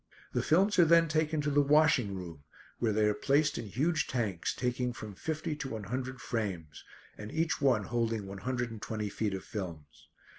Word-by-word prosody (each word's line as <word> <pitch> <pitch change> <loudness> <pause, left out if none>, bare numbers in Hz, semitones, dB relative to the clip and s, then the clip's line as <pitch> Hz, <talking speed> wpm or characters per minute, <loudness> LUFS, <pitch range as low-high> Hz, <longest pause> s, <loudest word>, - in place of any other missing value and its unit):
The - - +1
films 190 +5 +3
are 175 - +8
then 165 +1 +6
taken 155 0 +1
to 145 0 -1
the 145 +1 +4
washing 145 -8 +4
room, 85 -6 -8 0.4
where 115 -2 +1
they 105 0 +2
are 105 - +3
placed 145 +5 +2
in 110 - -5
huge 150 - 0
tanks, 105 -9 -1
taking 125 0 -1
from 110 -3 -8
fifty 155 - -3
to 135 -3 -4
one 110 -3 -5
hundred 130 +4 -4
frames, 90 -11 -4 0.4
and 105 +1 -7
each 165 -1 0
one 125 -7 +3
holding 115 -2 -1
one 95 0 -7
hundred 120 +2 -2
and 110 -2 -8
twenty 110 -2 -3
feet 100 -1 -2
of 95 - -6
films. 85 -8 -7
120 Hz, 195 wpm, -31 LUFS, 105-150 Hz, 0.4 s, are